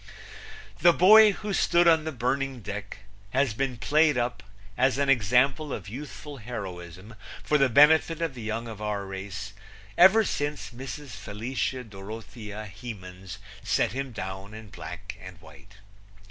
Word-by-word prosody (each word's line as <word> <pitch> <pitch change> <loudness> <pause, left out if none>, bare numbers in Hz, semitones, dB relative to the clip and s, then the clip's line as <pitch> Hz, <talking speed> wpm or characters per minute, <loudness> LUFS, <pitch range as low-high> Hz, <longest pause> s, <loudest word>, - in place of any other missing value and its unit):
The 175 +2 +6
boy 215 +5 +8
who 210 0 -5
stood 175 -2 +3
on 160 -2 +4
the 160 - -2
burning 130 0 -2
deck 100 0 -7 0.2
has 130 +1 +1
been 125 +1 -2
played 150 +3 +3
up 120 -3 -1 0.3
as 130 +1 +2
an 140 0 +1
example 135 +5 +2
of 100 -6 -5
youthful 145 +5 -8
heroism 95 -4 -8 0.3
for 150 - +2
the 135 -1 +4
benefit 155 +5 +5
of 165 -4 -2
the 125 - -9
young 110 +2 -3
of 110 -2 -8
our 105 -2 -2
race 95 +1 -7 0.5
ever 190 +5 +7
since 145 -8 -3
Mrs. 135 +4 -8
Felicia 120 +5 -4
Dorothea 105 0 -8
Hemans 95 -4 -9 0.3
set - - +1
him 135 +1 -4
down 95 -1 -7
in 110 -1 -10
black 90 -2 -8
and 95 -2 -11
white. 90 +5 -17
120 Hz, 145 wpm, -27 LUFS, 100-140 Hz, 0.5 s, boy